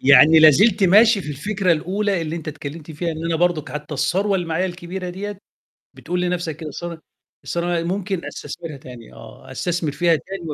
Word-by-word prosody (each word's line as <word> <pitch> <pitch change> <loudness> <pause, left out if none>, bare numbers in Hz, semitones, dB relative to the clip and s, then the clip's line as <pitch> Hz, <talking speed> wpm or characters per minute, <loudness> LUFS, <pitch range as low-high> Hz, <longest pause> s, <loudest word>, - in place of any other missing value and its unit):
يعني 140 +4 +7
لا 155 0 +9
زلت 200 - +3
ماشي 210 +3 +6
في 150 - -8
الفكرة 190 +5 0
الأولى 190 +3 -1
اللي 160 +1 -4
أنت 160 -2 -7
اتكلّمت 150 +2 -7
فيها 165 +2 -3
إن 160 +1 -6
أنا 165 -1 0
برضه 170 -3 +1
حتى 150 +1 -5
الثروة 195 +8 +1
اللي 175 -3 -1
معايا 165 +3 0
الكبيرة 180 0 -6
ديَّة، 200 +2 -6 0.6
بتقول 180 0 -3
لنفْسك 175 -4 -2
كده 160 -2 -7
الث 170 +2 -6 0.5
الثروة 175 0 -1
دي - - -4
ممكن 190 -1 -2
أستثمرها 165 -4 -7
تاني 125 -3 -12
آه، - - -13
أستثمر 170 -4 -2
فيها 165 +3 +3
تاني 190 +4 -8
170 Hz, 190 wpm, -21 LUFS, 155-185 Hz, 0.6 s, لا